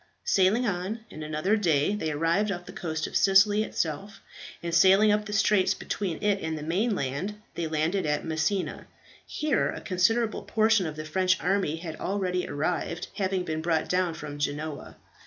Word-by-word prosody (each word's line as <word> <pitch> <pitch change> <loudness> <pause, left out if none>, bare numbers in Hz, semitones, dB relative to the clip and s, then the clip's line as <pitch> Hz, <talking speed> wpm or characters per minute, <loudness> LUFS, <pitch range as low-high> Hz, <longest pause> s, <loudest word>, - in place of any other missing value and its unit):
Sailing 205 +5 +3
on, 200 +2 -2
in 155 - -9
another 155 +7 0
day 170 -4 +2
they 185 -7 -2
arrived 165 +7 +1
off 175 -2 -5
the - - -9
coast 160 -2 -3
of - - -7
Sicily 205 +2 +5
itself, 195 +2 -3 0.4
and 170 -1 -3
sailing 195 +5 +6
up 210 0 +1
the 210 - -6
straits 200 -1 +3
between 185 -6 -3
it 205 -1 +2
and 160 -1 -3
the 150 - -6
mainland, 185 - -1
they 170 -1 -3
landed 160 +4 0
at 150 0 -1
Messina. 165 +4 -2 0.4
Here 300 -3 0
a - - -5
considerable 215 +5 +1
portion 220 -4 +2
of 155 - -6
the 155 0 -6
French 185 +3 +1
army 190 -4 0
had 165 -1 -7
already 185 -2 -1
arrived, 165 +3 -2
having 190 -2 0
been 160 -2 -3
brought 160 -1 0
down 180 -2 +1
from 145 -2 -7
Genoa. 150 +1 -4
180 Hz, 175 wpm, -27 LUFS, 160-205 Hz, 0.4 s, sailing